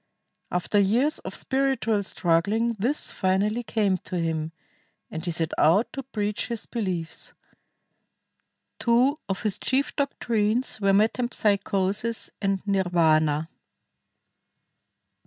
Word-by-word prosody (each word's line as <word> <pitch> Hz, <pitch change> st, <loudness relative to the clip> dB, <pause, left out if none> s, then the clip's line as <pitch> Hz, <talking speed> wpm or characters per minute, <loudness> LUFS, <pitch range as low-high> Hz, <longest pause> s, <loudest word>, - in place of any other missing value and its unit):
After 180 Hz, +3 st, +1 dB
years 240 Hz, +10 st, +2 dB
of -, -, -7 dB
spiritual 265 Hz, -6 st, 0 dB
struggling 200 Hz, +6 st, +1 dB
this 255 Hz, +9 st, -1 dB
finally 200 Hz, +5 st, +1 dB
came 210 Hz, -4 st, +1 dB
to 180 Hz, -, -5 dB
him, 160 Hz, -1 st, -1 dB, 0.6 s
and 160 Hz, -, -5 dB
he 175 Hz, -, -2 dB
set 165 Hz, -1 st, 0 dB
out 195 Hz, +9 st, +3 dB
to 275 Hz, -, -4 dB
preach 210 Hz, -5 st, -3 dB
his 235 Hz, -2 st, -4 dB
beliefs. 185 Hz, -8 st, -4 dB, 1.5 s
Two 250 Hz, +6 st, +3 dB
of 195 Hz, -, -2 dB
his 210 Hz, -3 st, 0 dB
chief 270 Hz, +2 st, 0 dB
doctrines 235 Hz, -5 st, 0 dB
were 195 Hz, 0 st, +3 dB
metempsychosis 210 Hz, -1 st, +1 dB
and 195 Hz, -1 st, -1 dB
nirvana. 165 Hz, -5 st, +2 dB
205 Hz, 105 wpm, -25 LUFS, 180-235 Hz, 1.5 s, out